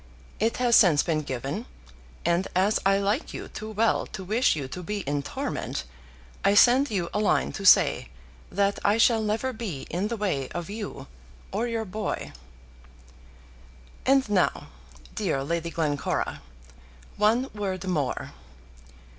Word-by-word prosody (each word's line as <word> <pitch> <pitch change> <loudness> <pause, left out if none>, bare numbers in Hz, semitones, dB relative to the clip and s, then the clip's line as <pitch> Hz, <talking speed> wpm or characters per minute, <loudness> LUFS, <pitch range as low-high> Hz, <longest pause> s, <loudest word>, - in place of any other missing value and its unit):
It 225 +2 +1
has 245 -2 +3
since 170 -9 +6
been 160 -3 0
given, 130 -5 -4 0.6
and 175 +3 +2
as 195 +4 +3
I 195 0 +4
like 205 +9 -1
you - - -7
too 215 - -7
well 220 +1 +1
to 190 - -7
wish 220 +5 +2
you 140 -4 -4
to 180 +7 -7
be 205 +3 -3
in 145 -3 -1
torment, 100 - -4 0.6
I 200 - +4
send 255 +6 +6
you 185 -5 -1
a 210 - 0
line 210 - +2
to 195 - -6
say - - +5 0.4
that 200 0 +1
I 205 +2 +3
shall 230 -1 +4
never 220 +5 -1
be 210 - -5
in 185 +5 -1
the 235 +1 -3
way 165 -11 -1
of 175 +2 -4
you 205 -10 -6 0.5
or 225 +5 -1
your 225 -1 -2
boy. 210 +1 -4 1.7
And 270 -1 +3
now, 200 -4 +1 0.4
dear 135 - -1
Lady 170 +3 -2
Glencora, 150 -4 -1 0.8
one 230 +6 +2
word 195 -3 -3
more. 155 -8 -2
200 Hz, 145 wpm, -26 LUFS, 170-220 Hz, 1.7 s, since